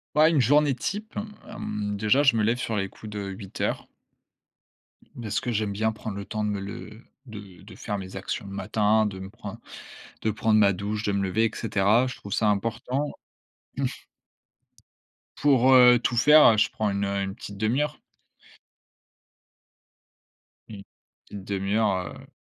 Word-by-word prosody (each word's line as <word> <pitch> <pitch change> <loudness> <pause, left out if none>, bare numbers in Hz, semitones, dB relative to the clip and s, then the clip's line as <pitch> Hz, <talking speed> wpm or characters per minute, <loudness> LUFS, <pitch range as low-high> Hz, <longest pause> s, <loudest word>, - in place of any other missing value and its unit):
Bah 155 +1 +6
une 160 -4 +2
journée 145 +3 +4
type. 210 - -5 0.3
Hem, 105 - -4
déjà 110 +7 +3
je 135 - +5
me 110 - +2
lève 115 +3 +1
sur 115 -3 -2
les 95 -1 -1
coups 105 +2 -11
de 105 0 -5
8:00 95 0 -4 1.3
beh, 115 -3 -6
ce - - 0
que 125 - -3
j'aime 105 -2 -1
bien 110 +2 0
prendre 105 -1 -7
le 100 - -5
temps 110 0 -3
de 105 - 0
me 100 -1 -3
le 105 +3 -9 0.2
de 100 -6 -11
de - - -13
faire 105 - -4
mes 95 -1 -8
actions 95 +1 -4
le 100 - -9
matin, 105 +2 +1
de 95 -2 -5
me 95 0 -8
prendre 105 +1 -9 0.6
de 110 - 0
prendre 110 +1 +2
ma 100 -2 +5
douche, 105 +3 -4
de 105 - 0
me 100 0 0
lever 105 +4 +1
et 115 - 0
cetera. 110 +3 +2
Je 125 - -6
trouve 100 - -7
ça 110 - +1
importan 115 +7 -1 2.3
Pour, 135 -2 +4
heu, 125 -1 +8
tout 120 - -1
faire, 150 +6 +7
heu, 110 - +1
je 110 - +3
prends 105 -1 -1
une, 100 0 -1
heu, 100 0 -1
une 95 0 -4
petite 100 -2 -9
demi-heure. 135 +8 -1 2.7
Une 105 -3 -9 0.5
une 100 -1 -7
demi-heure, 100 -1 0
heu, - - -15
105 Hz, 170 wpm, -26 LUFS, 100-120 Hz, 2.7 s, heu